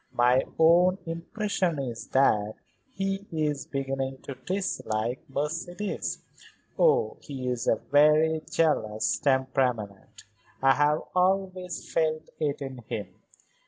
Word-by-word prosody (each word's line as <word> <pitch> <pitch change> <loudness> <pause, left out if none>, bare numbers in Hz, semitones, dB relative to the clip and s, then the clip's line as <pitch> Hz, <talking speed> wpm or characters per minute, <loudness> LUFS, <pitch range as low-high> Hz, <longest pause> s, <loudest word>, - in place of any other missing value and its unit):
My 125 +2 +4
own 175 +3 +5
impression 175 +1 -2
is 125 -5 -5
that 110 -6 +2 0.3
he 195 -3 -3
is 150 -3 -1
beginning 135 -1 -3
to 140 - -6
dislike 125 - -2
Mercedes. 165 +8 -3 0.6
Oh, 470 -1 +3
he 135 -4 -6
is 125 -2 -2
a - - +5 0.2
very 155 +2 +5
jealous 110 -10 +1
temperament; 130 -7 -1 0.4
I 135 0 +5
have 150 +2 +2
always 185 -1 0
felt 155 -1 0
it 145 -2 -1
in 130 -2 -7
him. 100 -4 -4
150 Hz, 110 wpm, -27 LUFS, 130-175 Hz, 0.6 s, own